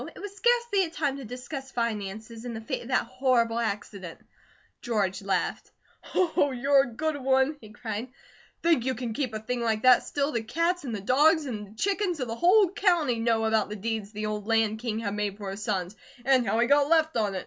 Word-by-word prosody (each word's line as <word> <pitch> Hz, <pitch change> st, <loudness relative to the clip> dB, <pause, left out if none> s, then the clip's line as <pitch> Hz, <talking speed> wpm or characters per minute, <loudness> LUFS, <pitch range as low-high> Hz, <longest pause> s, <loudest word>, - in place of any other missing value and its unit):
It -, -, -11 dB
was 405 Hz, 0 st, -7 dB
scarcely 475 Hz, -2 st, +2 dB
a 340 Hz, -, -3 dB
time 295 Hz, -5 st, -2 dB
to 275 Hz, -, -8 dB
discuss 255 Hz, +3 st, -7 dB
finances, 225 Hz, -1 st, -4 dB
in 240 Hz, -2 st, -5 dB
the 220 Hz, -, -6 dB
face 220 Hz, -, -4 dB
of 235 Hz, -, -10 dB
that 260 Hz, -, +1 dB
horrible 245 Hz, -2 st, +1 dB
accident." 200 Hz, -5 st, -4 dB, 0.6 s
George 200 Hz, -5 st, -1 dB
laughed. 195 Hz, -1 st, -2 dB, 0.5 s
"Oh, 345 Hz, -5 st, +2 dB
you're 275 Hz, +2 st, +3 dB
a 270 Hz, -, -2 dB
good 310 Hz, +5 st, -2 dB
one!" 265 Hz, +2 st, +2 dB
he 215 Hz, -, -12 dB
cried. 215 Hz, +2 st, -5 dB, 0.6 s
"Think 330 Hz, -7 st, +3 dB
you 260 Hz, +1 st, -1 dB
can 240 Hz, -3 st, -4 dB
keep 255 Hz, 0 st, -2 dB
a 215 Hz, -, -4 dB
thing 240 Hz, +3 st, -3 dB
like 220 Hz, -2 st, 0 dB
that 255 Hz, -1 st, +7 dB
still? 285 Hz, +1 st, -1 dB
The 235 Hz, -, -1 dB
cats, 335 Hz, +8 st, -1 dB
and 235 Hz, -4 st, -3 dB
the 200 Hz, -, -5 dB
dogs, 300 Hz, -, +4 dB
and 215 Hz, -6 st, -5 dB
the 210 Hz, -, -17 dB
chickens 390 Hz, -, 0 dB
of 255 Hz, -, -2 dB
the 230 Hz, -, -4 dB
whole 370 Hz, -, +4 dB
county 340 Hz, -, +2 dB
know 225 Hz, -1 st, +1 dB
about 220 Hz, -2 st, +1 dB
the 210 Hz, -, -5 dB
deeds 215 Hz, 0 st, -3 dB
the 215 Hz, 0 st, -4 dB
old 210 Hz, -1 st, -4 dB
Land 225 Hz, -1 st, +2 dB
King 225 Hz, -2 st, -3 dB
had 210 Hz, -3 st, -3 dB
made 205 Hz, -1 st, -2 dB
for 200 Hz, -2 st, -5 dB
his 200 Hz, +2 st, -7 dB
sons; 190 Hz, -2 st, -2 dB, 0.3 s
and 260 Hz, -3 st, +3 dB
how 220 Hz, -, +1 dB
he 235 Hz, -, +4 dB
got 285 Hz, +2 st, +3 dB
left 320 Hz, -1 st, +3 dB
on 210 Hz, -4 st, 0 dB
it. -, -, -1 dB
240 Hz, 225 wpm, -27 LUFS, 215-285 Hz, 0.6 s, that